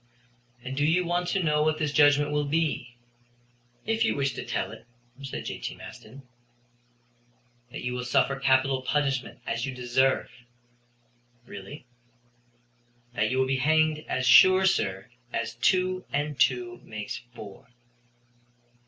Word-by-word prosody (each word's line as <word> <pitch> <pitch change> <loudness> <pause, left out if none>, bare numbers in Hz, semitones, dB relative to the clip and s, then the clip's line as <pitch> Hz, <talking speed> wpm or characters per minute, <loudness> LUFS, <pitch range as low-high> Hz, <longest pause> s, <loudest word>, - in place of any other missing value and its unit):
"And 130 +1 -5
do 145 - 0
you 170 +4 +2
want 175 +1 -1
to 190 +1 0
know 150 -2 +2
what 155 0 +1
this 150 -2 -1
judgment 145 -1 +4
will 150 0 0
be?" 150 -5 -1 0.9
"If 225 +1 +1
you 225 - +1
wish 140 -2 0
to - - -6
tell - - -3
it," - - -13 0.3
said 135 -2 -6
J.T. - - -5
Maston. 135 +1 -12 1.5
"That - - -8
you 125 0 -2
will 125 0 -3
suffer 135 +2 +1
capital 135 0 +2
punishment, 135 -1 -1
as 115 +3 -2
you 130 - -5
deserve." 125 +2 +1 1.1
"Really?" 100 +7 -10 1.3
"That 110 -2 0
you 130 - -1
will 130 - +3
be 135 0 0
hanged 155 +3 +2
as 130 - -1
sure, 185 +8 +7
sir, 95 - 0 0.2
as 115 -1 -3
two 185 +9 +1
and 145 -1 -2
two 120 -1 +1
make 105 -1 -7 0.2
four." 100 -2 -11
135 Hz, 140 wpm, -27 LUFS, 125-155 Hz, 1.5 s, sure